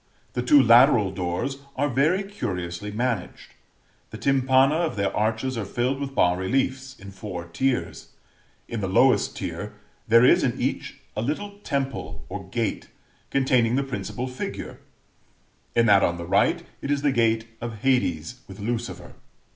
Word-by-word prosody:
The 125 - -1
two 125 +4 +6
lateral 120 -4 +6
doors 95 +9 -3 0.2
are 145 +2 +1
very 150 +9 +2
curiously 95 - -5
managed. 110 -3 -3 0.6
The - - -8
tympana 135 0 +3
of 165 0 0
their 100 -1 -1
arches 110 +4 -1
are - - -2
filled 125 +7 -1
with 135 -1 -5
bas 90 0 +3
reliefs, 130 +5 -1
in 100 0 -10
four 95 -3 -7
tiers; 125 +10 -2 0.6
in 115 -2 -4
the 95 - -1
lowest 125 +8 +3
tier - - -5 0.3
there 115 +2 +6
is - - +5
in - - 0
each - - -3 0.2
a 105 - -1
little 200 - -4
temple 140 -8 -4
or - - -7
gate - - -2 0.4
containing 125 -3 +2
the 140 - +1
principal 125 -1 -4
figure 125 0 -6 1.0
(in 115 0 +4
that 100 -3 +6
on 85 -2 +1
the 85 - -6
right, 95 +3 +2 0.2
it - - -5
is 145 0 0
the 145 - +3
gate 115 -2 +2 0.2
of 115 -3 -6
Hades 125 - 0
with 95 +1 -11
Lucifer). 115 +3 -4
120 Hz, 155 wpm, -25 LUFS, 100-135 Hz, 1.0 s, two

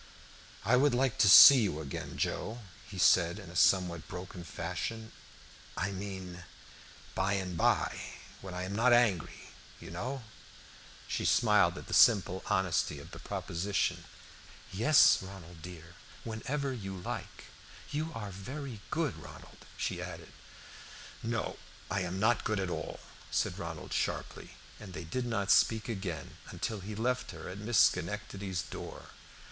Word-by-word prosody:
"I 120 +3 +4
would 140 0 +3
like 130 -1 +1
to 100 - +6
see 130 +6 +11
you 95 -8 -1
again, 70 -3 -6
Joe," 115 +3 -2 0.3
he 100 - -8
said 90 0 +4
in 95 -5 -10
a - - -12
somewhat 85 -1 +3
broken 90 0 -8
fashion. 90 +8 -5 0.7
"I 95 - -1
mean, 95 -2 -7 0.7
by 95 +1 0
and 95 -3 -2
by, 80 - +1 0.4
when 95 -2 -7
I 90 - -3
am 95 +2 -4
not 120 +3 +4
angry, 115 -9 +1 0.3
you - - -10
know." 125 +9 -4 0.8
Joe - - -2
smiled - - +4
at - - -8
the - - -7
simple 95 -5 +5
honesty 95 -6 +1
of 70 - -11
the - - -9
proposition. 100 +4 -2 0.7
"Yes, 140 +10 +6
Ronald 90 -4 -11
dear, 85 -1 -10 0.3
whenever 135 +5 -3
you 95 -5 -6
like. 90 - -6 0.5
You 155 +3 -2
are 105 -3 -5
very 125 +5 -7
good, 160 -2 -1
Ronald," - - -13
she - - -2
added. - - -8 0.9
"No, 115 -1 -3 0.3
I - - +1
am 90 +1 -3
not 110 +2 +2
good 110 -2 0
at 95 -2 -2
all," - - -5 0.3
said - - -1
Ronald - - -6
sharply, - - -3 0.2
and 100 -4 -10
they 80 - -6
did 120 +10 -3
not 100 -4 0
speak 110 +2 +4
again 95 -7 -5
until 110 -2 -4
he 105 +3 -7
left 125 +3 -1
her 80 -2 -8
at 90 +2 -7
Miss 115 +2 -1
Schenectady's 95 0 +1
door. - - -9
100 Hz, 150 wpm, -31 LUFS, 90-115 Hz, 0.9 s, see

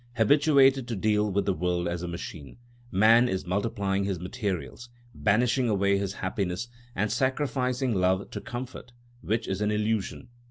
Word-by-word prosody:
Habituated 135 +1 +4
to 120 - -3
deal 105 +1 +1
with 100 +1 0
the 100 - +1
world 90 +1 -1
as 85 0 -3
a 90 - -4
machine, 85 -3 -7 0.3
man 115 +5 +5
is 95 -3 -2
multiplying 100 0 -1
his 95 -3 -2
materials, 95 - -4 0.2
banishing 120 +4 +2
away 100 -1 +2
his 100 -1 -2
happiness 95 +3 -3 0.3
and 105 +3 0
sacrificing 130 0 0
love 95 0 +1
to - - -5
comfort, 120 0 -7 0.3
which 110 +1 -1
is 95 +1 -2
an 105 - +1
illusion. 105 +3 -1
105 Hz, 155 wpm, -27 LUFS, 95-120 Hz, 0.3 s, man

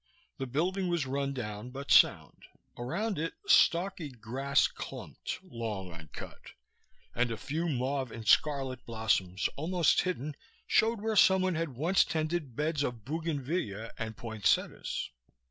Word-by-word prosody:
The 135 - -2
building 180 +8 0
was 170 -5 0
rundown 130 -5 -3
but 135 +2 -6
sound. - - +4 0.3
Around 175 - -2
it 165 +1 -2
stalky 170 -3 +4
grass 130 +3 +1
clumped, - - -6
long 110 - -5
uncut, 80 -4 -10 0.7
and 120 0 +1
a 115 - -3
few 160 +9 -2
mauve 130 -1 -1
and 110 -1 -8
scarlet 135 -4 +3
blossoms, 110 -5 0
almost 170 +2 +3
hidden, 155 -5 -3 0.3
showed 225 -1 +3
where 220 0 -1
someone 190 -2 +5
had 160 -5 -2
once 170 +9 +4
tended 155 -5 -2
beds 150 +1 0
of 120 -6 -3
bougainvillea 145 - -2
and 110 -1 -4
poinsettias. 110 -3 -1
140 Hz, 130 wpm, -31 LUFS, 115-165 Hz, 0.7 s, someone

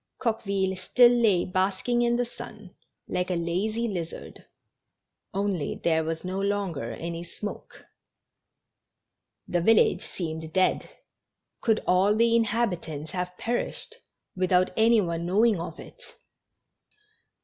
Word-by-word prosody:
Coqueville 200 -5 -1
still 240 +6 +5
lay 220 -7 +3
basking 190 +6 0
in 240 0 +2
the 245 0 +1
sun, 215 -4 -11 0.4
like 180 0 -2
a 180 - 0
lazy 195 +8 -1
lizard, 175 -6 -6 0.8
only 195 -6 -1
there 160 -1 +1
was 160 +2 -4
no 185 +1 -3
longer 195 - -2
any 170 +6 -5
smoke. 205 +4 -8 1.6
The 175 -2 0
village 225 +5 +4
seemed 160 -2 -6
dead; 185 0 +1 0.7
could 220 -2 +1
all 190 +3 +3
the 230 +1 +4
inhabitants 185 -10 -1
have 180 -1 -4
perished 240 - -3 0.4
without 185 0 +2
any 225 0 +5
one 170 -2 -2
know 205 +6 +4
ing 220 -6 +3
of 170 - -6
it? - - -12
190 Hz, 120 wpm, -27 LUFS, 175-225 Hz, 1.6 s, still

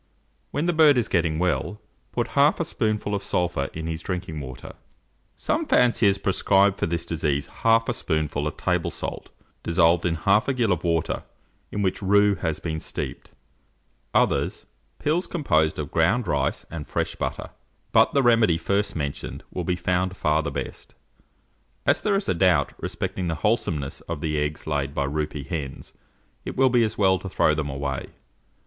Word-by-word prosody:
When 145 - -1
the 175 - +2
bird 155 -4 +6
is 120 - +1
getting 80 -3 +1
well, 90 +4 -1 0.3
put - - -1
half - - +3
a - - 0
spoonful 105 -1 -1
of 100 - -1
sulphur 90 -8 -1
in 80 0 -6
his 80 0 -3
drinking 90 -3 -4
water. 65 -3 -8 0.6
Some - - -1
fanciers 115 -5 +4
prescribe 100 +1 +3
for - - -1
this 85 0 -2
disease 75 -4 -1
half 115 0 +2
a 120 - +1
spoonful 75 -6 -1
of - - -5
table 90 -2 0
salt, - - -6 0.3
dissolved 85 0 +3
in 85 - 0
half 100 +7 +2
a 135 - +1
gill 115 -5 +1
of 85 -2 0
water, 85 -2 0 0.5
in 105 - -1
which 95 +1 0
rue 100 +1 +4
has 80 -5 -2
been 80 -2 -3
steeped; - - -6 0.8
others, - - +1 0.3
pills 165 +5 0
composed 80 - +1
of 75 -3 -4
ground 100 +9 +2
rice - - 0
and 80 -3 -6
fresh - - -2
butter: - - -4 0.4
but - - +5
the 140 - +4
remedy 115 -8 +4
first 100 +4 -1
mentioned 70 -3 -4
will - - -3
be 90 - 0
found 90 +1 -1
far 75 +1 +2
the 80 - -3
best. 70 - -6 0.9
As - - +3
there 205 -2 +1
is 195 - -1
a - - +2
doubt 85 -5 +3
respecting 90 - -3
the 80 - -1
wholesomeness 80 -11 0
of 75 - -3
the 75 -2 -1
eggs 75 0 -3
laid 70 -2 -2
by 70 - 0
roupy 75 0 -3
hens, 75 -6 -5 0.5
it - - -6
will 130 0 +5
be 120 -1 +4
as 110 -1 -1
well 95 -2 +3
to 95 - -7
throw 80 - +3
them 75 -2 -2
away. 70 -1 -3
85 Hz, 180 wpm, -25 LUFS, 80-105 Hz, 0.9 s, bird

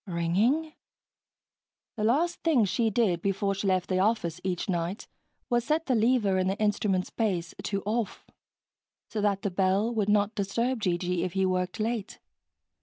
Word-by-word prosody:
Ringing? 205 - +1 1.2
The 215 - -3
last 305 +10 +1
thing 290 -10 +3
she 225 +4 +1
did 195 -6 +1
before 195 +1 0
she 195 +1 -3
left 185 -2 +1
the 185 -1 0
office 185 -5 0
each 180 -2 -2
night 175 +1 -2 0.4
was 240 -1 +1
set 310 +5 0
the 260 - +1
lever 220 -4 +2
in 185 - +1
the 195 +2 -1
instrument's 205 -3 0
base 180 -7 -1
to 200 -1 -2
"off," 220 +1 -2 0.8
so 215 - -3
that 200 -1 +1
the 200 - -1
bell 195 +5 +1
would 210 -3 0
not 205 +1 +2
disturb 230 +5 -1
G.G. 180 -2 0
if 180 -2 -3
he 190 -1 +1
worked 185 0 -1
late. 220 -1 -2
200 Hz, 165 wpm, -28 LUFS, 185-230 Hz, 1.2 s, thing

